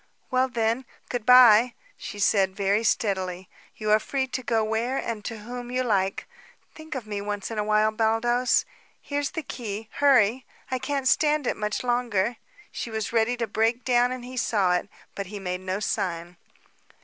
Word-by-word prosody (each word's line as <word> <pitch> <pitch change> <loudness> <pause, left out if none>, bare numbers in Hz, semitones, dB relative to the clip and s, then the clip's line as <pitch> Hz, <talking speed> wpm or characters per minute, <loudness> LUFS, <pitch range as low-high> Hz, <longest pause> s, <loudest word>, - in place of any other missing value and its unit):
"Well, 255 +1 +2
then, 230 +1 0 0.2
good 240 -3 -4
bye," 245 -2 +7 0.2
she - - -8
said 195 -2 +2
very 200 +2 +1
steadily. 190 -6 -1 0.3
"You 215 -1 -1
are 215 - +6
free 265 +4 -2
to 255 0 -4
go 225 -3 +1
where 225 +4 -1
and 225 -3 -4
to 225 -2 -5
whom 245 +2 -7
you 255 +1 0
like. 195 -5 0 0.5
Think 315 -1 -9
of 250 -4 -5
me 205 -1 -4
once 205 +1 -4
in 220 - -3
awhile, 215 +1 +2
Baldos. 230 +3 +2 0.3
Here's 285 -1 -2
the 325 -3 -5
key. 220 -4 -6
Hurry! 260 -4 +3 0.3
I 260 - +1
I - - -9
can't 275 0 -2
stand 300 +2 +3
it - - 0
much 210 +2 -3
longer!" 240 -3 0 0.3
She - - -5
was 220 0 -4
ready 235 +2 +2
to 235 - -1
break 225 +3 0
down 245 0 +3
and 255 -1 -5
he 255 +1 -8
saw 200 -6 +2
it, 180 +3 -1 0.2
but 200 -1 -5
he 205 +1 -7
made 180 -1 -4
no 185 +1 -3
sign. 175 -4 -3
225 Hz, 185 wpm, -25 LUFS, 205-250 Hz, 0.5 s, bye